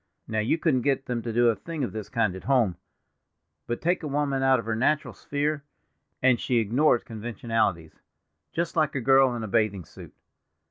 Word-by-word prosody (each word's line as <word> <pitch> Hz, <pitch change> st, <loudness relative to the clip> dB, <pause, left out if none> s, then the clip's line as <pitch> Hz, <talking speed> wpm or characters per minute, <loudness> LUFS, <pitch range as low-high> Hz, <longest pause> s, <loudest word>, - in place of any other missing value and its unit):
Now, 110 Hz, -1 st, -1 dB
you 110 Hz, +9 st, +1 dB
couldn't 150 Hz, -6 st, +1 dB
get 135 Hz, +1 st, 0 dB
them 120 Hz, -2 st, -2 dB
to 115 Hz, -, -4 dB
do 120 Hz, +1 st, +4 dB
a 115 Hz, -, +2 dB
thing 155 Hz, +8 st, -5 dB
of 125 Hz, -, -2 dB
this 110 Hz, -2 st, -6 dB
kind 115 Hz, -6 st, 0 dB
at 95 Hz, -, -10 dB
home; 120 Hz, -10 st, +2 dB, 0.9 s
but 120 Hz, -, -3 dB
take 175 Hz, +2 st, +1 dB
a 155 Hz, -, -4 dB
woman 140 Hz, -1 st, 0 dB
out 135 Hz, 0 st, +4 dB
of 115 Hz, -, -5 dB
her 110 Hz, -1 st, -1 dB
natural 150 Hz, +6 st, +1 dB
sphere, 145 Hz, 0 st, -2 dB, 0.6 s
and 130 Hz, -3 st, +4 dB
she 125 Hz, -, -1 dB
ignores 120 Hz, +4 st, +2 dB
conventionalities, 110 Hz, -7 st, -2 dB, 0.5 s
just 170 Hz, 0 st, -2 dB
like 155 Hz, -2 st, +1 dB
a -, -, 0 dB
girl 135 Hz, 0 st, +4 dB
in 115 Hz, -, -4 dB
a -, -, -4 dB
bathing 100 Hz, -3 st, 0 dB
suit. -, -, -13 dB
125 Hz, 195 wpm, -26 LUFS, 110-140 Hz, 0.9 s, do